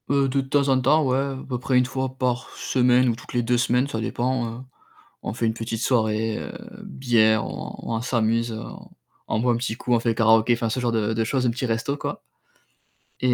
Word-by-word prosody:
Heu, 140 0 +3
de 135 +1 +1
temps 140 +1 +1
en 130 -1 +4
temps, 150 +5 +4
ouais, 130 0 +2
à 135 0 -2
peu 125 -2 -3
près 130 0 +1
1 125 - +4
fois 130 +1 -2
par 125 -1 -1
semaine 125 0 +3
ou 115 - 0
toutes 115 - -12
les 120 -1 +1
2 120 +1 +2
semaines, 125 +2 +2
ça 115 -5 -4
dépend, 120 +1 -1
heu, 115 +2 -7 0.6
on - - -3
fait 115 +1 -1
une 110 - +1
petite 115 0 -4
soirée, 110 -3 +1
heu, - - -7 0.3
bière, 110 -4 +2
on - - -6 0.2
on 115 - -1
s'amuse, 115 -1 0
on 110 - -8 0.4
on 110 - 0
boit 125 +1 +2
un - - 0
petit 120 -1 -2
coup, 120 0 0
on 115 - +3
fait 115 -1 +1
karaoké, 115 +1 +4
enfin, 115 -1 -1
ce 120 +4 -2
genre 120 -1 0
de 110 -1 0
de 115 0 0
choses, 130 +3 0
un - - +3
petit 125 +2 -3
resto, 115 +5 -1
quoi - - -5 1.0
et 125 -1 +2
120 Hz, 230 wpm, -24 LUFS, 115-130 Hz, 1.0 s, en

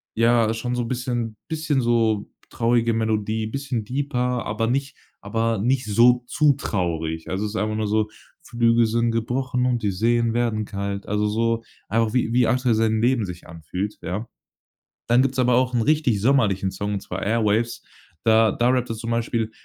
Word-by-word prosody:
ja, 115 -1 +3
schon 120 +2 -3
so 125 - -1
'n - - -5
bisschen 120 -3 -3
bisschen 155 -4 0
so 115 -3 +1 0.2
traurige 115 0 +1
Melodie, 110 0 -1
bisschen 130 -1 -3
deeper, 125 0 -2
aber 110 +2 -1
nicht 135 +3 -1 0.3
aber 115 +2 -1
nicht 125 +4 +1
so 120 +4 +4
zu 150 +1 +3
traurig. 80 - -3
Also, 95 +4 -2
ist 105 +1 -5
einfach 110 -1 -1
nur 110 -1 -1
so, 105 +1 +1 0.3
„Flügel 120 -4 +2
sind 115 +1 +1
gebrochen 125 +2 -1
und 125 -2 0
die 105 - 0
Seen 115 +4 +1
werden 115 -3 0
kalt.“ 100 -1 -5
Also 105 +1 0
so, 115 +1 0 0.2
einfach 115 0 0
wie 120 -2 +1
wie 125 0 +4
Axel 125 -1 +2
sein 110 0 +1
Leben 120 -2 +2
sich 90 -2 -9
anfühlt, 90 +5 -5
ja? 105 +6 -4 0.8
Dann 120 +2 +5
gibt's 135 -1 -1
aber 125 -1 +3
auch 125 +1 +2
'n 120 - +2
richtig 130 -5 +2
sommerlichen 105 -6 +2
Song, 100 +2 -4
und 100 - -2
zwar 95 0 -6
„Airwaves“. 115 +1 0 0.4
Da 110 -1 +4
da 120 - +1
rappt 125 -1 +1
er 115 - -2
zum 115 +1 -5
Beispiel 115 -1 -1
115 Hz, 180 wpm, -23 LUFS, 105-125 Hz, 0.8 s, Dann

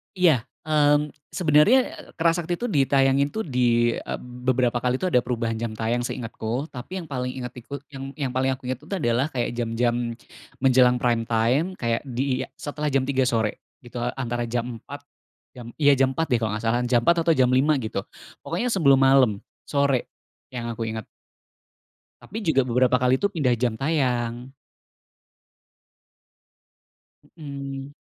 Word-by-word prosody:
Iya, 160 -10 +3 0.2
mmm, 150 -1 +3 0.2
sebenarnya, 170 - +5
eee, - - -12
Kera 165 0 +3
Sakti 175 0 -2
itu 245 +3 -4
ditayangin, 135 -1 +3
tuh, 220 0 -2
dieb 120 -4 +2 0.2
beberapa 125 0 0
kali 125 +1 0
tuh 185 - +1
ada 125 - +5
perubahan 115 -2 -2
jam 115 -2 -3
tayang 120 +2 -1
seingetku. 120 +4 -4
Tapi 175 +9 -6
yang - - -12
paling 125 -2 -3
inget 125 -1 -5
iku 140 +4 -7
yang 135 0 -7
yang 135 -5 -2
paling 130 +1 +1
aku 130 -1 -8
ingat 130 -1 -2
itu 150 - -17
adalah 125 -3 +1
kayak 120 -2 -1
jam-jam 120 0 0 0.5
menjelang 125 -1 +5
prime 120 -2 +1
time, 120 +7 +2
kayak 115 -5 -1
disetelah 140 +3 -3
jam 135 -1 +3
03:00 130 -1 +1
sore 110 -3 0 0.2
gitu, 120 0 -7 0.2
antara 120 -2 -2
jam 120 0 -3
04:00. 145 +4 -10 0.6
Jam 120 -1 -9
iya, 140 -2 +6
jam 135 0 +2
04:00 160 0 -1
deh, 125 - +3
kalau 110 -2 -2
nggak 110 +2 -4
salah, 115 +2 +1
jam 120 -1 +3
04:00 170 +5 +2
atau 165 - +5
jam 130 -3 +3
05:00 135 +2 +3
gitu, 110 -3 -4 0.4
pokoknya 210 +9 -1
sebelum 140 - +4
malam, 135 -4 +5 0.3
sore 140 -3 +1 0.5
yang 120 -1 -4
aku 115 0 -4
ingat. 110 -1 -5 1.2
Tapi 220 +3 -7
juga 135 -8 +2
beberapa 125 +1 +3
kali 125 0 +2
itu 200 - +2
pindah 145 -9 +1
jam 120 -1 -1
tayang. 125 -4 -1 2.9
Mhm. 140 -2 -7
130 Hz, 160 wpm, -24 LUFS, 120-145 Hz, 2.9 s, iya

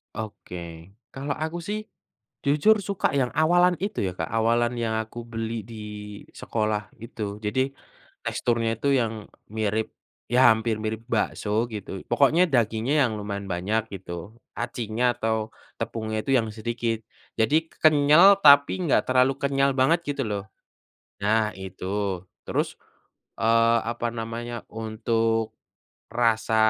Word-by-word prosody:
Oke. 85 -5 -8 0.2
Kalau 140 +2 -3
aku 160 +2 -3
sih, 210 +1 -1 0.7
jujur 150 +10 +4
suka 195 -6 -1
yang 125 - +1
awalan 175 +3 +4
itu 205 -1 -3
ya 90 - -1
Kak, - - -3
awalan 115 +2 +2
yang 115 -2 -1
aku 115 +2 -9
beli 115 0 -3
di 110 -1 -9 0.6
sekolah 105 -2 -1 0.2
itu. 105 -3 -5
Jadi, 105 +5 0 0.6
teksturnya 115 -1 0
itu 140 - 0
yang 110 -2 -3 0.2
mirip, 110 0 -1 0.4
ya 125 0 +7
hampir 110 0 -1
mirip 110 +1 -3
bakso 110 0 0
gitu, 95 -3 -6
pokoknya 145 +5 +4
dagingnya 115 +2 +1
yang 120 - 0
lumayan 100 -1 -4
banyak 95 +5 0
gitu, 95 +3 -8 0.2
acinya 120 -1 -3
atau 110 -1 -1 0.3
tepungnya 110 -1 -3
itu 135 - 0
yang 115 -3 +1
sedikit. 115 0 -3 0.4
Jadi 155 +9 +2
ke - - -25
kenyal 155 +6 +7
tapi 140 +4 +7
enggak 165 - +2
terlalu 130 +1 +4
kenyal 140 0 +2
banget 150 +6 +3
gitu 140 -1 -1
loh, 100 -1 -3 0.8
nah, 110 +1 +2
itu. 95 0 -3 0.2
Terus, - - -2 0.6
eee, 115 +1 +4
apa 120 0 -3
namanya, 115 +1 -5
untuk 115 0 -1 0.6
rasa 115 -2 +1
115 Hz, 130 wpm, -25 LUFS, 110-130 Hz, 0.8 s, ya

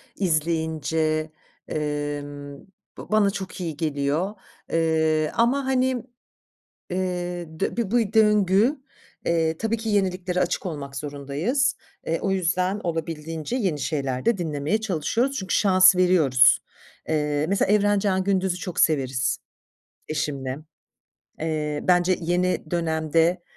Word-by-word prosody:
izleyince, 160 -2 0 0.4
emm, 145 -1 -4 0.4
b - - -7
bana 210 -2 +4
çok 190 -2 -6
iyi 160 -4 -4
geliyor, 155 +5 -1 0.4
eee, 160 -1 +2
ama, 250 +4 +2
hani, 260 -2 +1 0.9
eee, 180 -2 -3
dö - - 0
bu - - -11
bir 225 -5 -1
bu 225 -3 +1
döngü, 210 +4 +4 0.5
eee, 165 -1 +1
tabii 225 +3 -1
ki 225 0 -4
yeniliklere 185 -3 0
açık 180 +1 -1
olmak 140 -5 -5
zorundayız. 150 - -1 0.3
Eee, 165 +1 0
o 195 - 0
yüzden 185 +2 0
olabildiğince 165 +2 -3
yeni 185 - 0
şeyler 135 -5 -2
de 235 -3 +3
dinlemeye 160 +4 -1
çalışıyoruz 220 - 0
çünkü 190 - -1
şans 185 -2 +6
veriyoruz. 160 -9 +5 0.5
Eee, 150 -1 0
mesela 200 0 +2
Evrencan 205 -2 +2
Gündüz'ü 190 -2 +1
çok 180 -2 -5
severiz 135 -4 +2 0.7
eşimle. 140 -4 -2 0.8
Eee, 155 -2 -2
bence 180 0 +3
yeni 175 -1 0
dönemde, 165 +1 +1
170 Hz, 115 wpm, -24 LUFS, 155-195 Hz, 0.9 s, şans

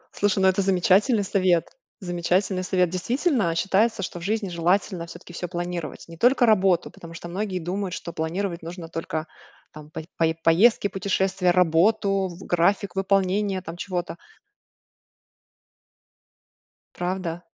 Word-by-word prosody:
Слушай, 205 -1 +1
ну, - - +6
это 190 +1 +3
замечательный 195 +4 +3
совет, 185 -3 +1 0.3
замечательный 185 +1 0
совет. 180 -2 +1
Действительно, 225 - 0
считается, 195 +4 +1
что 175 - -5
в - - -10
жизни 215 +1 -1
желательно 175 0 0
всё-таки 175 - -12
всё 180 - -4
планировать, 175 -2 -5
не 165 0 -11
только 245 +5 +4
работу, 190 -5 +3
потому 165 -1 -12
что 170 - -8
многие 190 +1 -3
думают, 180 +2 -3
что 170 - -7
планировать 170 +3 -3
нужно 170 0 -8
только 160 -1 -4 0.5
там 150 -1 -11
по 155 - -6 0.2
пое 160 -1 +2
поездки, 205 +6 +4
путешествия, 190 -1 0
работу, 190 +3 +3
в 175 +1 -10
график 195 +4 +1
выполнения 195 0 +1
там 165 -1 -7
чего-то. 175 -1 -4 2.8
Правда? 175 -1 -3
185 Hz, 135 wpm, -24 LUFS, 170-195 Hz, 2.8 s, ну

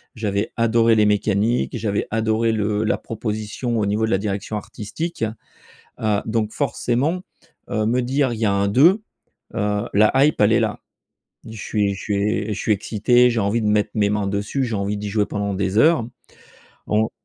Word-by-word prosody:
j'avais 105 -1 -2
adoré 115 0 +3
les 105 -1 +4
mécaniques, 105 +4 +1
j'avais 105 -3 -1
adoré 110 +1 +1
le 105 -1 0
la 110 - +1
proposition 110 +2 -4
au 105 - +1
niveau 105 +2 +1
de 110 - -2
la 95 - +2
direction 100 +1 -3
artistique. 110 +9 -5 0.8
Heu, 105 -2 +1
donc 110 -1 -1
forcément 140 +5 -1 0.5
heu, 110 -1 0
me 120 +3 +1
dire: 130 +1 0
«Il 110 - -6
y 115 - +1
a 100 - +3
un 100 0 +1
2», 170 - +4 0.5
heu, 105 -2 0
la 105 +1 +5
hype 150 - 0
elle 105 +2 +5
est - - +4
là. - - -1 0.7
Je 110 - -9
suis 100 -1 -1
je 95 - -9
suis 105 - -1
é 105 +1 -1
je - - -6
suis 110 - +1
excité, 115 +4 +3
j'ai 115 -2 0
envie 105 +3 0
de - - 0
mettre 105 0 +2
mes 105 -2 +2
mains 105 -1 -1
dessus, 105 +7 -1
j'ai 115 -3 -3
envie 100 +1 -2
d'y 105 0 -4
jouer 105 0 +1
pendant 100 -1 -3
des 95 +1 -1
heures, 155 -3 +4 0.8
en 110 +1 +1
110 Hz, 190 wpm, -21 LUFS, 105-115 Hz, 0.8 s, la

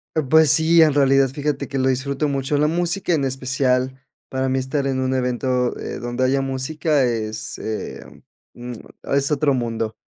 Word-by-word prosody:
Eh, 155 - +2
pues 155 +2 +5
sí, 165 +1 +5
en 155 -2 +5
realidad 135 -1 +4
fíjate 145 +2 -3
que 140 - -3
lo 130 - +1
disfruto 135 +3 0
mucho, 140 +1 -1
la 150 +1 +3
música 175 +3 0
en 150 -4 +1
especial 130 0 0 0.3
para 130 0 -2
mí 130 0 +1
estar 135 +2 -2
en 135 -1 -1
un 130 0 0
evento, 125 -1 0
eh, - - -5
donde 120 +1 -2
haya 135 +1 +2
música 140 +3 0
es, 110 -3 -3
eh, 110 -1 -5 0.5
mm 120 0 -8 0.4
es 140 +2 +1
otro 145 -1 +2
mundo, 115 -3 -2
135 Hz, 180 wpm, -21 LUFS, 130-145 Hz, 0.5 s, pues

